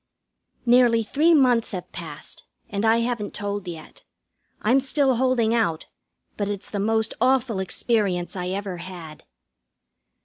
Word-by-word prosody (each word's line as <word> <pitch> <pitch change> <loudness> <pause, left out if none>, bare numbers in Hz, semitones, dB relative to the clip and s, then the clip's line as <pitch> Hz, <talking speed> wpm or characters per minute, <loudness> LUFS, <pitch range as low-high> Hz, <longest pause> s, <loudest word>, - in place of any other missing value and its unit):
Nearly 240 -1 +5
three 310 +9 +3
months 245 -6 +3
have 180 -1 -6
passed, 155 -3 -8 0.3
and 200 +1 -2
I 225 +1 +4
haven't 235 -3 -3
told 205 -2 -4
yet. 165 -3 -9 0.6
I'm 245 +6 +4
still 270 -1 +1
holding 245 -3 +2
out, 205 -9 0 0.5
but 205 - -1
it's 200 -1 -5
the 205 - -2
most 220 +2 +1
awful 255 -4 +2
experience 190 -3 0
I 180 -1 -3
ever 190 -1 -3
had. 170 -3 -9
215 Hz, 135 wpm, -24 LUFS, 185-245 Hz, 0.6 s, Nearly